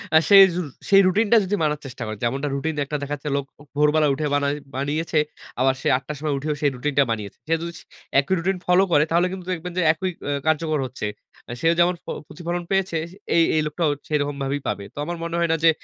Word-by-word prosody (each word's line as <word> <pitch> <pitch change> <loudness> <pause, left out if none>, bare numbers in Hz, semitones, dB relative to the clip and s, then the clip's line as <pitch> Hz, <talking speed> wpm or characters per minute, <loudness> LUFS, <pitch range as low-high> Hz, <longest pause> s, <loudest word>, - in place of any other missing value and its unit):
আ - - +10
সেই 200 -1 +10
রু 180 - 0 0.3
সেই 195 0 +7
রুটিনটা 215 +4 +4
যদি 200 +2 0
মানার 150 -1 0
চেষ্টা 125 -2 -7
করে। 110 0 -5
যেমনটা 135 +5 0
রুটিন 160 +3 -2
একটা 150 +2 -3
দেখাচ্ছে 145 +1 -4
লোক 140 -1 -1
ও - - -15 0.2
ভোরবেলা 150 +1 +4
উঠে 150 +3 -2
বানাই 140 0 +1 0.2
বানিয়েছে। 150 +4 0 0.4
আবার 130 +1 +4
সে - - -2
৮ 130 - -10
টার 150 - -5
সময় 150 -1 -1
উঠেও 150 +2 -2
সেই 145 - +3
রুটিনটা 140 +2 +2
বানিয়েছে। 105 -3 -4
সে 165 - +1
যদি 170 0 -5
স - - -14 0.4
একই 140 +7 0
রুটিন 185 +3 0
ফলো 180 +2 +5
করে, 145 -2 +5
তাহলে 175 +2 +3
কিন্তু 185 -1 -7
দেখবেন 180 +1 -5
যে - - +3
একই 185 +3 -3 0.2
এ - - 0 0.2
কার্যকর 155 -1 +1
হচ্ছে। 125 -3 -6 0.4
অ্যা - - -6
সেও 165 +1 +4
যেমন 175 +1 +4
ফ - - -73 0.2
প্রতিফলন 175 0 -4
পেয়েছে 195 -3 +1
সে 190 - -15 0.2
এ - - +6 0.2
এই 155 - +3
লোকটাও 150 0 0 0.2
সেরকমভাবেই 145 -2 -1
পাবে। 100 - -2
তো - - -28
আমার 175 +2 -4
মনে 170 0 -3
হয় 170 -1 +1
না - - +4
যে 165 - +7
155 Hz, 230 wpm, -23 LUFS, 140-175 Hz, 0.4 s, আ